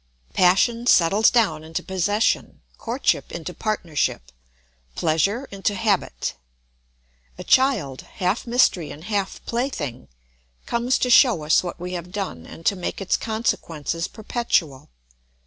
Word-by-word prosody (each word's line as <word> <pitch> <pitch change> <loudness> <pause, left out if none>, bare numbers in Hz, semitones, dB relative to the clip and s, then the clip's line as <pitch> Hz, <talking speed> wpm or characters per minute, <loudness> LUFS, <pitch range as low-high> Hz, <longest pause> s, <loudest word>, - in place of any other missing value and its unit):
Passion 230 +7 +3
settles 195 +3 +5
down 195 -11 +1
into 160 +1 -4
possession, 205 +3 0 0.2
courtship - - -1
into - - -6
partnership, 165 - -2 0.6
pleasure 195 - 0
into 200 +1 -1
habit. 200 -2 -1 1.0
A - - -7
child, 225 - +2
half 195 +6 -2
mystery 215 - +2
and 150 +3 -10
half 200 -1 -3
plaything, 170 - -3 0.6
comes 240 +2 +1
to 250 - 0
show 235 - +6
us 155 +1 +4
what 175 -1 -6
we 180 +1 -5
have 175 0 -6
done 190 - -5
and 165 - -12
to 200 - +3
make 180 - -4
its 195 - +1
consequences 170 -8 -2
perpetual. 195 - -2
190 Hz, 125 wpm, -23 LUFS, 165-230 Hz, 1.0 s, show